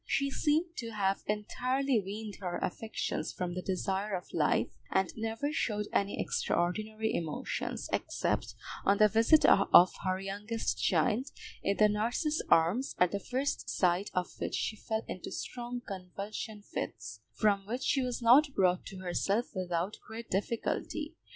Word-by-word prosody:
She 275 0 0
seemed 320 +5 +1
to 230 -2 -4
have 195 -2 +1
entirely 255 +5 0
weaned 210 +2 -6
her 180 -3 -3
affections 220 +5 -3
from 180 -1 -3
the 185 - -3
desire 195 +2 -1
of 180 - -7
life, - - +1
and 190 -2 +1
never 225 +6 -2
showed 210 -8 0
any 200 0 +1
extraordinary 215 +5 0
emotions, 160 -3 -3
except - - -1 0.3
on 200 +1 +4
the 215 - +7
visit 225 +9 +5
of 180 +1 +7
her 185 0 0
youngest 205 +4 -3
child, 245 +3 +2 0.3
in 200 - 0
the 215 - +6
nurse's 235 +9 0
arms, 175 +11 +3
at 180 -1 +4
the 200 - -1
first 260 +7 -2
sight 180 +2 +1
of 180 -1 -1
which - - -2
she 215 - -1
fell 220 +1 -3
into 185 - -6
strong 245 0 -5
convulsion 200 +3 -6
fits, 110 - -6
from 200 -2 +2
which 245 +4 -3
she 275 - +2
was 250 -1 -3
not 275 +5 +7
brought 185 -2 +3
to 190 -1 -8
herself 195 +5 0
without 180 +1 -2
great 225 +1 -8
difficulty. 235 - -2
210 Hz, 150 wpm, -31 LUFS, 185-240 Hz, 0.3 s, the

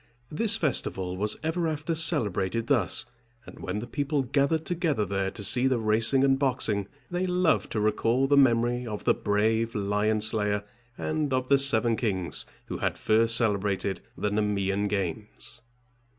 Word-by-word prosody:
This 225 +7 +2
festival 95 - 0
was 105 +3 0
ever 165 +1 -1
after 155 +1 -3
celebrated 115 - +1
thus; 120 -2 +2 0.4
and - - -13
when 95 +2 -4
the 110 - -4
people 140 +3 -2
gathered 140 +5 0
together 160 - -1
there 95 -1 -2
to 105 - -7
see 125 +6 +3
the 130 -2 +1
racing 115 +4 +2
and 135 -1 +3
boxing, 110 -7 0 0.2
they 175 +1 -1
loved 180 -2 +1
to 110 - -1
recall 115 +4 +1
the 140 +1 +2
memory 120 -2 +2
of 105 -2 -6
the - - +3
brave 110 +2 0
lion 105 +1 0
slayer, 105 -2 0 0.3
and 155 -2 -2
of 130 0 -1
the 140 -1 +5
seven 120 -4 +4
kings 95 -7 -1 0.2
who - - -6
had - - -2
first 115 +1 +3
celebrated 100 -4 -1 0.2
the 105 - -2
Nemean 100 -1 -1
games. 100 +4 -4
115 Hz, 160 wpm, -26 LUFS, 105-140 Hz, 0.4 s, the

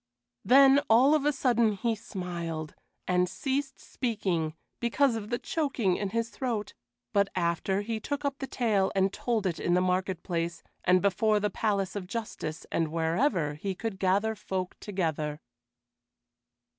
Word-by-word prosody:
Then 275 +2 +7
of 275 +6 +5
a 295 - +4
sudden 235 -5 +2
he 225 +4 0
smiled, 170 -7 -5 0.3
and 180 0 +2
ceased 270 +6 -2
speaking 185 - -2 0.2
because 240 +1 +2
of 215 -2 -5
the 240 - 0
choking 255 - 0
in 200 - -2
his 230 +2 -1
throat; 230 -6 -3 0.4
but 200 -1 +4
after, 180 +2 0
he 220 +1 -3
took 285 +4 -4
up 275 -1 -1
the 270 - -4
tale 215 -7 +1
and 195 0 +2
told 230 -4 -1
it 175 -3 -1
in 175 - +1
the - - +4
market 185 -1 0
place 170 -2 -2 0.2
and 180 +1 +4
before 210 +2 +3
the 205 -1 -1
Palace 200 -2 -1
of 190 -3 -4
Justice 205 -7 -5
and 165 - +1
wherever 165 - +1
he 190 +6 -4
could 215 -2 -4
gather 200 +4 +2
folk 185 -3 -4
together. 155 -6 -2
200 Hz, 155 wpm, -29 LUFS, 180-235 Hz, 0.4 s, Then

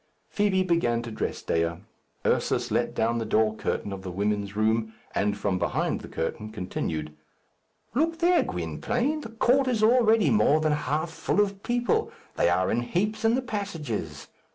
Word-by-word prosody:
Fibi 200 -2 +2
began 120 -10 +1
to 120 - -6
dress 110 - -3
Dea. 85 0 +1 0.5
Ursus - - +1
let - - 0
down 115 +1 +1
the - - -1
door 110 -1 +2
curtain 105 -1 -2
of 95 - -6
the 95 - -6
women's 100 +2 -1
room, 110 +1 +1 0.2
and 105 0 0
from 100 -2 -1
behind - - -1
the - - -9
curtain 105 +6 -4
continued, 80 -7 -4 0.8
"Look 325 +6 +1
there, 345 +1 +4
Gwynplaine! 235 - -2
the 230 - -8
court 250 +4 +2
is 230 -4 +1
already 225 -2 +5
more 155 -8 +4
than 155 0 +1
half 150 +2 -1
full 165 - -1
of 200 -1 +1
people. 240 +1 0 0.2
They - - +3
are 90 +1 +2
in 120 - +1
heaps 200 - -1
in 225 +1 +4
the 260 - -1
passages. 155 - -4
145 Hz, 170 wpm, -27 LUFS, -, 0.8 s, already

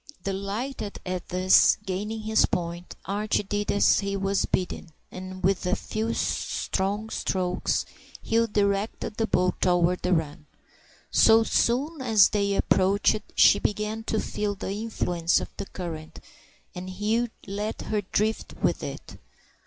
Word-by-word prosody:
Delighted 200 +4 -4
at 180 -1 -4
thus 185 +1 +5
gaining 210 +4 -3
his 220 0 +3
point, 175 0 -4
Archie 205 +3 0
did 205 +1 -2
as 205 - +4
he 200 0 -2
was 195 0 0
bidden, 180 -2 -2 0.2
and 185 0 -8
with 190 0 +1
a - - +2
few 225 +1 -3
strong 205 +3 -2
strokes 180 -1 -1 0.4
Hugh 230 +1 +2
directed 205 0 -1
the 225 - 0
boat 180 -3 +1
toward 180 0 +2
the 180 - -1
run. 150 -2 -2 0.6
So 225 0 +6
soon 270 +7 +1
as 220 -5 +5
they 200 -1 0
approached 200 +3 +2
she 200 - +6
began 210 +2 -2
to 220 - 0
feel 210 -1 -2
the 190 - -5
influence 180 -5 0
of - - -8
the 200 - -5
current, 165 -3 -7 0.5
and 185 0 -7
Hugh 215 +5 0 0.2
let 205 +2 -4
her 215 -1 -1
drift 215 +3 -1
with - - 0
it. - - -8
200 Hz, 140 wpm, -26 LUFS, 185-215 Hz, 0.6 s, So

